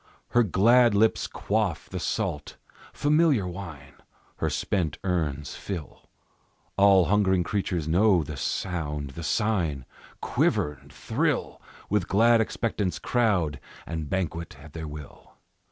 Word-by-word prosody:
Her 120 - +4
glad 115 +3 +4
lips 110 +2 +2
quaff 105 -6 -1
the - - -5
salt, 75 -1 -3 0.3
familiar 145 - +2
wine; 85 -7 -8 0.4
Her - - 0
spent 85 -7 -1
urns 75 -6 -1
fill; 85 -7 -7 0.7
All 100 -2 +6
hungering 95 -2 +2
creatures 90 -4 -2
know 90 +1 +4
the 75 +1 -7
sound, 75 -2 -3
the 85 - -8
sign, 85 - 0 0.3
Quiver 75 - +1
and 70 +1 -18
thrill, 65 - -1 0.3
With 105 +1 0
glad 115 +3 +4
expectance 105 -4 -2
crowd 95 - +1 0.3
and 80 -2 -5
banquet 85 -4 -3
at 75 +1 -13
their 80 -1 -6
will. 75 -2 -11
90 Hz, 120 wpm, -26 LUFS, 75-105 Hz, 0.7 s, All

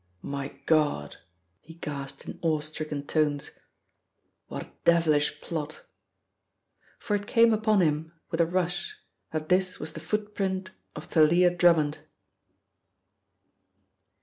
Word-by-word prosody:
"My 140 0 -5
God!" 150 - +1 0.4
he 165 +1 -14
gasped 140 -4 -6
in - - -8
awe 160 -2 +2
stricken 155 -1 -4
tones. 150 -2 0 1.0
"What - - -5
a - - -18
devilish 155 -3 +3
plot!" 155 -2 -5 1.1
For 210 - -1
it 205 0 -3
came 230 -2 +5
upon 215 -2 +3
him 155 -1 +1 0.2
with 165 - +1
a 165 - +3
rush 180 - -1 0.3
that 155 0 -4
this 185 0 +2
was 160 - -6
the - - -6
footprint 195 -3 -2 0.2
of - - -7
Thalia 170 +3 +5
Drummond. 165 -4 +3
165 Hz, 120 wpm, -28 LUFS, 150-185 Hz, 1.1 s, came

